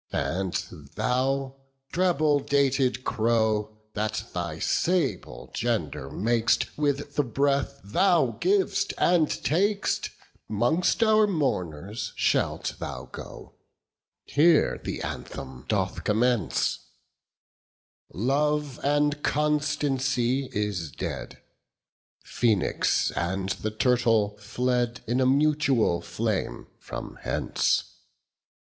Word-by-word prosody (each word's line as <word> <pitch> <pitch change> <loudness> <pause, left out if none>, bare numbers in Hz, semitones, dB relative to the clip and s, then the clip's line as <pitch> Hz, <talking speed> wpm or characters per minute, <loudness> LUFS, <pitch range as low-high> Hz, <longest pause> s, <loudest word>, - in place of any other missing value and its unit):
And 85 +7 -1 0.4
thou, 135 +2 0 0.3
treble 155 -5 +2
dated 135 -2 +1
crow, 110 -2 +1 0.2
That 110 0 -2
thy 85 -3 -3
sable 120 - -1
gender 70 - -2
mak'st 115 +5 +1
With 145 -1 -1
the 145 - +2
breath 140 +2 0
thou 160 - +2
giv'st 390 +1 +1
and 170 -3 +4
tak'st, 200 +6 0 0.4
'Mongst 155 - +2
our 215 -1 +5
mourners 100 - -2
shalt - - 0
thou 65 0 -6
go. - - -10 0.7
20 145 - -1
Here 165 -1 +4
the - - -4
anthem 65 -1 -7
doth 95 -4 -1
commence:— 115 -2 +1 1.3
Love 145 - 0
and 145 +1 +2
constancy 140 -4 +1
is 100 - -2
dead; - - -6 0.8
Phoenix 110 -6 +1
and 95 +5 -2
the 110 - -2
turtle 115 -2 +2
fled 120 +2 -1
In 125 +3 0
a 130 - +4
mutual 140 - +2
flame 95 +4 -2
from - - -8
hence. - - +1
125 Hz, 95 wpm, -26 LUFS, 105-145 Hz, 1.3 s, our